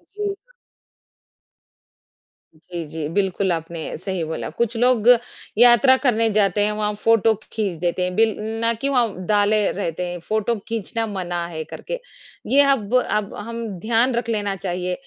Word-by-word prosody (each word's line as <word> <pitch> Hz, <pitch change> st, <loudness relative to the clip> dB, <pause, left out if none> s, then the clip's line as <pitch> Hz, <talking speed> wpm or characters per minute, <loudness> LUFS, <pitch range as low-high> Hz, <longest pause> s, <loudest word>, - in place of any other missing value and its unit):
जी। 415 Hz, -1 st, -2 dB, 2.2 s
जी, 170 Hz, +2 st, -7 dB
जी 155 Hz, 0 st, -4 dB
बिल्कुल 190 Hz, -1 st, 0 dB
आपने 165 Hz, 0 st, -4 dB, 0.2 s
सही 185 Hz, 0 st, -3 dB
बोला, 160 Hz, 0 st, -4 dB
कुछ 235 Hz, 0 st, -2 dB
लोग 240 Hz, -2 st, +3 dB, 0.5 s
यात्रा 245 Hz, +2 st, +7 dB
करने 230 Hz, -4 st, +3 dB
जाते 205 Hz, -1 st, +2 dB
हैं 210 Hz, -, +1 dB
वहाँ 210 Hz, 0 st, -1 dB
फ़ोटो 225 Hz, +1 st, +3 dB, 0.2 s
खींच 210 Hz, -4 st, -1 dB
देते 175 Hz, +1 st, 0 dB
हैं। 180 Hz, 0 st, -2 dB
बिल 220 Hz, 0 st, +3 dB, 0.3 s
ना 230 Hz, 0 st, +2 dB
कि 250 Hz, +5 st, -2 dB
वहाँ 230 Hz, -9 st, 0 dB
डाले 210 Hz, +2 st, +3 dB
रहते 180 Hz, -2 st, -3 dB
हैं, 175 Hz, 0 st, -5 dB
फ़ोटो 215 Hz, +5 st, -1 dB
खींचना 225 Hz, 0 st, -2 dB
मना 175 Hz, -4 st, -3 dB
है 160 Hz, -2 st, -5 dB
करके। -, -, -6 dB, 0.5 s
ये 280 Hz, +2 st, +7 dB
अब 235 Hz, -3 st, 0 dB
अब 210 Hz, -1 st, -2 dB
हम 230 Hz, 0 st, -5 dB
ध्यान 230 Hz, +5 st, +2 dB
रख 235 Hz, 0 st, -2 dB
लेना 205 Hz, -3 st, -1 dB
चाहिए। 180 Hz, -1 st, -3 dB
210 Hz, 150 wpm, -22 LUFS, 180-230 Hz, 2.2 s, यात्रा